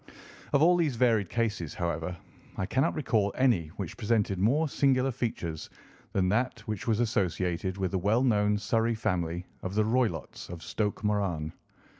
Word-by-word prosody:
Of 140 - +4
all 175 +2 +6
these 155 -7 +1
varied 115 -6 +2
cases, 105 -9 -1
however, 85 0 -2 0.4
I 95 - -1
cannot 135 - +1
recall 110 -9 +1
any 120 -12 +3
which 95 -5 -5
presented 105 -4 +1
more 140 +11 +3
singular 135 -2 +2
features 90 - -4 0.4
than 95 -1 +1
that 115 +3 0
which 105 -1 -5
was 110 -1 +2
associated 95 -4 0
with 95 -3 -1
the 95 - 0
well 105 +7 +2
known 105 -4 +3
Surrey 115 +2 +1
family 90 -5 -1 0.2
of 95 +1 -4
the 110 0 +3
Roylotts 110 - -1
of 85 -1 -8
Stoke 105 +4 -2
Moran. 95 -7 0
105 Hz, 160 wpm, -29 LUFS, 90-120 Hz, 0.4 s, all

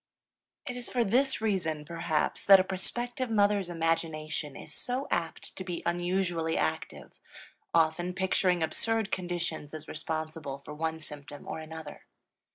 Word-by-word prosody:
It 250 -4 -4
is 245 -1 -4
for 245 -2 +2
this 255 +4 +2
reason, 170 -8 0
perhaps, 165 -1 0
that 195 -1 +10
a - - +4
prospective 240 +6 -1
mother's 205 -3 +3
imagination 160 -3 -1
is - - -8
so 255 +3 0
apt 165 -1 -2
to 190 - -3
be 175 -2 -4
unusually 175 -2 +1
active, 80 - -2 0.6
often 165 +2 +3
picturing 185 -2 +2
absurd 225 +5 +1
conditions 175 -4 -2
as 155 0 -8
responsible 155 -3 -4
for - - -6
one 160 +1 -2
symptom 145 -2 -9
or - - -3
another. 160 -1 -8
170 Hz, 140 wpm, -30 LUFS, 155-195 Hz, 0.6 s, that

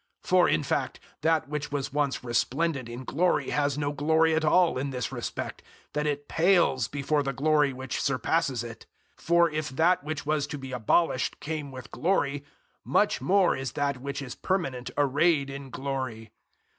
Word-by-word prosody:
003:010 - - -11
For, - - +5
in - - +2
fact, - - -2 0.2
that 160 -1 +2
which 150 0 -4
was 140 -2 -3
once 145 -3 0
resplendent 130 +2 0
in 120 +2 -7
glory 175 +7 +1
has 145 -1 +1
no 145 -1 -1
glory 160 +2 +2
at 160 0 +1
all 165 -2 +3
in 140 +2 -2
this 125 -1 -3
respect, 120 -3 -5 0.3
that 150 0 0
it 145 -1 -2
pales 165 - +3
before 145 +4 0
the 135 -1 -2
glory 145 +1 +3
which 130 0 -4
surpasses 135 -1 0
it. 115 -1 -9 0.3
003:011 - - -18
For 170 -1 +4
if 155 0 -2
that 160 +5 +2
which 150 -1 -4
was 150 -1 0
to 150 - -5
be 135 -1 -8
abolished 125 +3 +1
came 150 -2 -4
with 130 -1 -10
glory, 145 -6 0 0.4
much - - +2
more 185 +6 +3
is 135 -2 -4
that 140 -3 -1
which 140 +1 -4
is 125 - -6
permanent 135 -10 -2
arrayed 145 0 +2
in 135 0 -7
glory. 130 -5 -4
145 Hz, 180 wpm, -27 LUFS, 130-155 Hz, 0.4 s, For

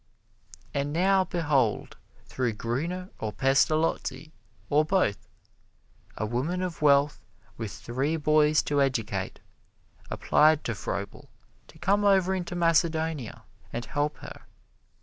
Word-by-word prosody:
And 140 0 -1
now 190 +4 +3
behold, 145 -11 0 0.3
through 125 -3 -2
Gruner 165 - -3
or 110 - -3
Pestalozzi 155 +5 +1 0.4
or 150 +2 +3
both, 155 - 0 0.9
a 110 - -1
woman 140 +12 -2
of 175 -4 -5
wealth 145 0 +3 0.3
with 110 -3 -5
three 135 +7 -2
boys 155 0 +3
to 145 -1 +1
educate 110 -8 -2 0.7
applied 155 0 +3
to 115 - -2
Froebel 100 -1 -5 0.4
to - - -17
come 200 +4 +1
over 190 -2 +4
into 175 -2 -3
Macedonia 160 -5 0 0.3
and 120 0 -4
help 145 +6 -2
her. - - -11
150 Hz, 115 wpm, -27 LUFS, 125-170 Hz, 0.9 s, over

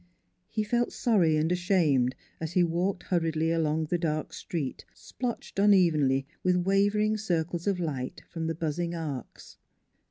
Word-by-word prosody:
He 215 - -1
felt 240 +3 0
sorry 180 -10 +2
and 160 +2 +1
ashamed 165 -9 +2 0.2
as 160 +1 -4
he 180 - +4
walked 175 +3 -1
hurriedly 165 -2 0
along 160 -1 +1
the 170 +3 -1
dark 155 -2 -2
street, 150 -7 -4
splotched 240 -5 -5
unevenly 160 -10 +4 0.2
with 180 0 +2
wavering 200 +4 +2
circles 175 -3 -2
of 195 -3 +1
light 140 -7 -4
from 165 -2 -4
the 165 - -1
buzzing 170 +2 -2
arcs. 150 -7 -7
170 Hz, 145 wpm, -28 LUFS, 155-190 Hz, 0.2 s, he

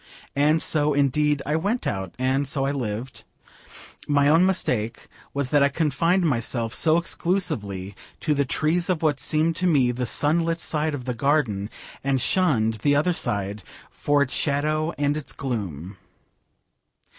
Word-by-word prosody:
And 150 +3 +2
so, 150 -2 +1
indeed, 145 +1 +1
I 150 - 0
went 205 +9 -1
out, 95 -2 -3
and 130 +2 0
so 140 -1 -1
I 140 - 0
lived. 125 -2 -5 0.8
My 145 -1 +3
only 165 +4 +5
mistake 120 - -1 0.2
was 140 -2 -3
that 145 - +4
I 140 - +4
confined 165 +5 +1
myself 115 -5 -1
so 160 0 +3
exclusively 105 - -1 0.3
to 155 - +1
the 140 -1 +1
trees 160 +6 0
of 175 -3 0
what 150 -3 +1
seemed 155 +5 +1
to 185 - 0
me 135 -7 +3
the 125 0 -3
sun 155 +7 +2
lit 165 0 -1
side 155 -2 0
of 130 -3 -7
the 125 - -2
garden, 120 -6 0 0.3
and 135 -1 +1
shunned 115 - +1
the 145 +5 +3
other 155 +5 +2
side 100 - -2 0.3
for 145 -1 +1
its 135 - -5
shadow 155 +2 0
and 145 0 +1
its 150 -3 -4
gloom. 95 - -5
145 Hz, 160 wpm, -24 LUFS, 125-155 Hz, 0.8 s, only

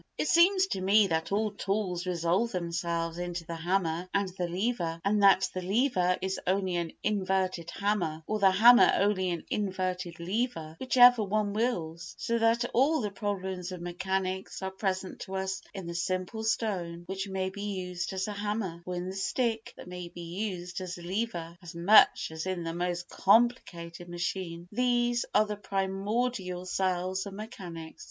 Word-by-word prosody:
It - - 0
seems 370 +4 +5
to 195 - -3
me 200 +3 +5
that 160 -2 -1
all 210 +1 +1
tools 195 -3 -2
resolve 180 +6 +1
themselves 170 -1 -2
into 175 -1 -4
the 170 - -5
hammer 170 +1 -1
and 200 0 +2
the 180 -1 -3
lever, 175 -3 -1
and 205 +1 +2
that 195 -1 +6
the 185 - -3
lever 185 -2 +2
is 190 0 -1
only 185 -1 +1
an 170 -1 -3
inverted 190 -4 0
hammer, 175 -6 -1
or 215 +3 -1
the 195 -1 +6
hammer 240 +6 +7
only 195 -2 +2
an 170 -2 -3
inverted 185 -4 -2
lever, 175 -4 -2
whichever 245 -2 +6
one 205 0 0
wills; 170 -8 -2
so 235 0 -1
that 230 +1 +3
all 280 +5 +3
the 210 -2 -2
problems 190 -3 -3
of 180 - -6
mechanics 185 +2 -3
are 190 - -2
present 190 -1 -3
to 190 - -6
us 190 0 -2
in 190 -3 -7
the 170 - -5
simple 185 +5 -2
stone 185 -7 -1
which 190 +2 -4
may 190 0 -2
be 200 +1 -8
used 180 -3 -3
as 190 +1 -2
a 210 - -3
hammer, 205 -4 -3
or 180 - -3
in 175 +1 -3
the 190 - -5
stick 225 +3 -1
that - - -10
may 180 -1 -7
be 175 - -10 0.3
used 180 0 -6
as 185 -1 -5
a 175 - -10
lever, 175 -3 -3
as 175 -1 -10
much 175 0 +5
as 160 +3 -5
in 185 -2 -2
the 165 0 -3
most 175 0 -2
complicated 180 -6 +1
machine. 175 -1 -4
These 240 +1 +1
are 215 - +6
the 210 0 -4
primordial 195 0 -2
cells 185 +1 -1
of 195 - -8
mechanics. 180 -7 -8
190 Hz, 175 wpm, -29 LUFS, 175-210 Hz, 0.3 s, hammer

